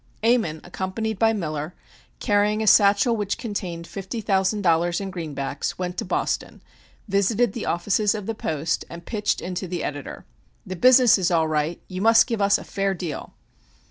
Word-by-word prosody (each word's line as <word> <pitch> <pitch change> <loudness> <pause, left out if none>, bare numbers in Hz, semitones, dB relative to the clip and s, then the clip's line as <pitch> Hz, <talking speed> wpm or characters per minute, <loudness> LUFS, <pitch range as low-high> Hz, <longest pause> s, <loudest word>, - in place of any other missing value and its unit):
Ammon, 220 -10 +2
accompanied 190 +4 -4
by 225 0 +4
Miller, 155 -5 -4 0.4
carrying 210 0 +1
a - - -1
satchel 205 +3 +5
which 205 -2 -2
contained 185 -7 -5
fifty 195 +6 -6
thousand 200 0 0
dollars 170 0 +2
in 195 -1 -5
greenbacks, 145 -6 -4
went 180 -1 -3
to - - -3
Boston, 180 - -2 0.4
visited 200 +4 +1
the 235 - -5
offices 205 +4 +1
of 210 -2 -5
the 225 - -2
Post, 160 -5 -2
and 170 0 -10
pitched 210 -2 -1
into 185 +1 -4
the 175 0 -4
editor. 145 -2 -6 0.4
"The 185 - -5
business 250 +2 +6
is 180 -1 +1
all 165 -3 +2
right; 155 +2 -1
you 185 0 -5
must 225 +1 +6
give 230 -4 -3
us 200 0 +4
a - - -9
fair 195 -1 -1
deal!" 165 -6 -6
195 Hz, 175 wpm, -23 LUFS, 170-215 Hz, 0.4 s, business